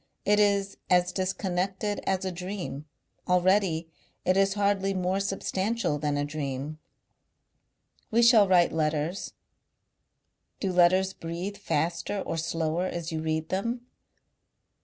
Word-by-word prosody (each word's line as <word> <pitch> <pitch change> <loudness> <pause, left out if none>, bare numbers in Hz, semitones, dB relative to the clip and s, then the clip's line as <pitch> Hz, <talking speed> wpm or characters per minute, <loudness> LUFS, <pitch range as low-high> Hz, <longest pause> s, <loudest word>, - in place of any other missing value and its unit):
It 210 +1 +4
is 200 -1 +2
as 180 0 +4
disconnected 190 +2 -1
as 190 0 0
a 185 - -1
dream.... 180 -5 -5 0.4
Already 180 -2 +2 0.4
it 185 - +3
is 195 0 +3
hardly 200 -1 +1
more 185 +1 0
substantial 195 -2 -1
than 145 -1 0
a 145 - 0
dream.... 145 0 -4 1.3
"We 235 +1 +3
shall 230 -4 +7
write 180 -2 +4
letters. 155 +3 -1 1.3
Do 190 -3 -1
letters 185 +2 +4
breathe 175 +5 -5
faster 170 +1 -1
or 165 - -3
slower 165 +2 -1
as 170 -2 -4
you 160 -1 -2
read 160 0 -2
them? 230 +6 -2
185 Hz, 120 wpm, -28 LUFS, 165-195 Hz, 1.3 s, shall